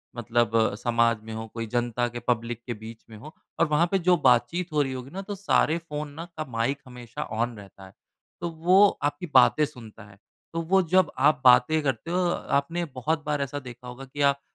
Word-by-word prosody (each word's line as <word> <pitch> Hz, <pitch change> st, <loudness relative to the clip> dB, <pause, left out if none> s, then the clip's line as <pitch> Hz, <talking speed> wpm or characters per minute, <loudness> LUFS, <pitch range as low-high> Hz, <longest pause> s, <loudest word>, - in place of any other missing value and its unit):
मतलब 115 Hz, -2 st, +1 dB
समाज 115 Hz, -2 st, +2 dB
में 110 Hz, 0 st, -8 dB
हो, 110 Hz, 0 st, -6 dB
कोई 115 Hz, +1 st, -6 dB
जनता 120 Hz, +1 st, -1 dB
के 120 Hz, 0 st, -6 dB
पब्लिक 120 Hz, -1 st, -1 dB
के 120 Hz, -, -3 dB
बीच 110 Hz, +1 st, -11 dB
में 110 Hz, -, -11 dB
हों 150 Hz, +8 st, -11 dB, 0.3 s
और 170 Hz, -, +5 dB
वहाँ 155 Hz, +3 st, +2 dB
पे 195 Hz, -, +3 dB
जो 180 Hz, +1 st, +4 dB
बातचीत 140 Hz, +7 st, +2 dB
हो 150 Hz, -, +3 dB
रही 135 Hz, -2 st, -1 dB
होगी 130 Hz, +1 st, -7 dB
ना, 195 Hz, +2 st, -5 dB
तो 200 Hz, +1 st, -6 dB
सारे 185 Hz, -4 st, +2 dB
फोन 150 Hz, 0 st, -4 dB
ना 165 Hz, +3 st, -7 dB
का 155 Hz, -, -3 dB
माइक 120 Hz, +5 st, -1 dB
हमेशा 120 Hz, -2 st, -7 dB
ऑन 115 Hz, +1 st, -3 dB
रहता 100 Hz, -1 st, -13 dB
है। 95 Hz, -, -15 dB, 0.5 s
तो 170 Hz, -, -2 dB
वो 180 Hz, +5 st, +5 dB, 0.2 s
आपकी 145 Hz, +4 st, -1 dB
बातें 155 Hz, -, +5 dB
सुनता 115 Hz, -6 st, -12 dB
है। 100 Hz, -1 st, -17 dB, 0.4 s
तो 165 Hz, -, -1 dB
वो 190 Hz, +4 st, +3 dB
जब, 185 Hz, +1 st, +2 dB
आप 140 Hz, +1 st, +3 dB
बातें 125 Hz, +5 st, +5 dB
करते 135 Hz, +4 st, -2 dB
हो 180 Hz, -, +1 dB, 0.4 s
आपने 165 Hz, +5 st, -2 dB
बहुत 150 Hz, +3 st, -3 dB
बार 150 Hz, -1 st, -1 dB
ऐसा 140 Hz, +1 st, -3 dB
देखा 125 Hz, -1 st, -11 dB
होगा 125 Hz, +2 st, -9 dB
कि 145 Hz, +2 st, -7 dB
आप 140 Hz, 0 st, +3 dB
130 Hz, 215 wpm, -26 LUFS, 115-155 Hz, 0.5 s, और